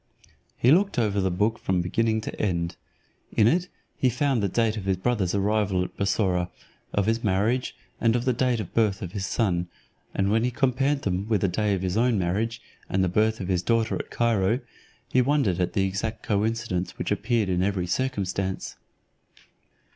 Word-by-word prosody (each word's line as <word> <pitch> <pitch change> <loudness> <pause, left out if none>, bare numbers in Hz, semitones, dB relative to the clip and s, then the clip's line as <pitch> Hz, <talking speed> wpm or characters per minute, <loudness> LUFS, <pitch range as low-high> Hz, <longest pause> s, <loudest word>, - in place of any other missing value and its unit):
He 125 - +4
looked 195 +2 +3
over 105 -4 +1
the 95 - +1
book 105 +6 0
from 90 -2 0
beginning 110 +4 +1
to - - -5
end. 85 -4 -1 0.6
In 105 - +6
it 175 +7 +2 0.3
he 130 - +2
found 135 -1 +1
the 100 - +1
date 115 +1 +1
of 105 -4 -5
his 95 -1 +1
brother's 100 -2 0
arrival 100 -2 +1
at 90 - -7
Bussorah, 95 -3 +1 0.4
of 100 - +1
his 115 +2 0
marriage, 110 +6 +1 0.2
and 115 0 +3
of 120 +1 -1
the 130 - +3
birth 115 -4 0
of 90 - -5
his 95 -1 -3
son; 90 -6 0 0.5
and 100 +1 +1
when 115 +1 +3
he 125 - +2
compared 135 +2 +1
them 95 +1 -1
with 105 -4 +2
the - - +3
day 100 +2 +1
of 95 - -4
his 95 +2 -1
own 120 -1 +3
marriage, 105 +6 -1 0.3
and 95 0 +1
the 95 - +1
birth 110 +4 +2
of 95 - -4
his 90 -2 +1
daughter 115 +3 +1
at - - -4
Cairo, 115 0 +1 0.5
he 130 - +4
wondered 125 - +1
at 90 - 0
the 95 - +2
exact 105 +4 -3
coincidence 105 -3 -1
which - - -3
appeared 115 -2 +1
in 90 -1 +1
every 95 -2 0
circumstance. 95 -3 -2
105 Hz, 185 wpm, -26 LUFS, 95-115 Hz, 0.6 s, In